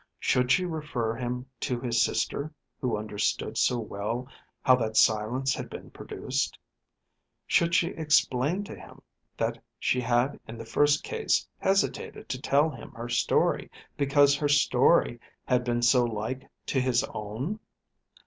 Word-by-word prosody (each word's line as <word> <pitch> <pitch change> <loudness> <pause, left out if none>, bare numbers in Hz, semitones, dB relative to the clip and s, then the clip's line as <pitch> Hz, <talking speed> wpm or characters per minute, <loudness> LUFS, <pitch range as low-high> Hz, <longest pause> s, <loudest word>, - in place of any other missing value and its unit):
Should 125 0 +2
she 185 +5 +4
refer 150 -9 -2
him 125 +1 -4
to 125 -2 -2
his 120 -1 +1
sister, 145 +5 -1 0.3
who 125 -4 -1
understood 105 -1 -2
so 125 - +2
well 115 +3 -4 0.4
how 130 - +6
that 110 -2 -2
silence 115 +5 +3
had - - -5
been - - -9
produced? - - -3 0.9
Should 170 0 +2
she 170 - +3
explain 150 +1 +1
to - - -8
him - - -14 0.3
that - - -2
she 125 - +1
had 125 +3 +1
in 115 - -8
the 115 - -8
first 145 +6 +2
case 455 -1 0
hesitated 195 +1 0
to 130 0 -3
tell 145 +2 +3
him 120 - -10
her 120 +1 -7
story 120 -1 +1 0.3
because 140 0 +4
her 145 0 0
story 130 -2 +4 0.3
had 125 -1 +2
been 120 -1 -1
so 125 +1 +5
like 115 +3 -4 0.2
to 135 - 0
his 125 -1 +2
own? 115 - -4
125 Hz, 150 wpm, -28 LUFS, 120-145 Hz, 0.9 s, how